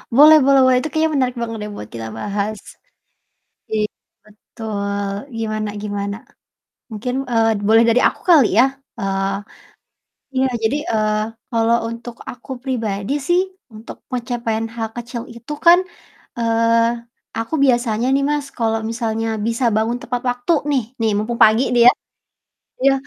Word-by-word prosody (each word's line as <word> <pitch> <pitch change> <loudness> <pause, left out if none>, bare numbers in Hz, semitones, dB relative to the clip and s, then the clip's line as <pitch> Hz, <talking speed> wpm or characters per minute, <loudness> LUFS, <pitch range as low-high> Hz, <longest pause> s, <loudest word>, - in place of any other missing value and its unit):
Boleh 305 +3 +9
boleh 275 -1 +5
boleh, 255 -1 +5
itu 310 - -3
kayaknya 315 +1 +1
menarik 255 -2 +1
banget 225 -1 -3
deh 210 - -6
buat 105 - -8
kita 115 -1 -5
bahas. 205 +1 -2 1.1
I 220 - -1 0.5
betul, 205 -2 -5 0.3
gimana 215 -1 -2
gimana? 200 -1 -3 0.7
Mungkin, 230 +3 -4
eee, 225 -3 +2
boleh 225 +1 +6
dari 230 +2 +4
aku - - -8
kali 285 -10 +7
ya. 260 - +7 0.3
Eee 195 0 -1 1.0
iya 265 +1 +3 0.2
jadi, 255 +7 +1 0.2
eee, 215 -1 +1 0.3
kalau 230 +1 +3
untuk 235 +1 -8 0.2
aku 245 +2 -12
pribadi 225 -3 -2
sih 350 +6 +2 0.3
untuk 215 +2 -10
pencapaian 235 -3 -2
hal 225 -1 -3
kecil 240 0 -5
itu 235 +4 -8
kan, 345 +1 +8 0.6
eee, 230 0 +2 0.5
aku 225 +7 -4
biasanya 240 -3 +2
nih 275 - +2
Mas 295 -1 -1
kalau 225 -1 +1
misalnya 225 -1 -2 0.2
bisa 230 +2 -1
bangun 225 +2 +1
tepat 245 0 -3
waktu 245 +6 0 0.2
nih, 270 -3 +2 0.2
nih 225 -1 +2
mumpung 230 +3 -2
pagi 220 +3 +6
nih 240 -1 +4
ya, - - +8 0.9
iya 275 +1 +5
230 Hz, 145 wpm, -19 LUFS, 215-250 Hz, 1.1 s, Boleh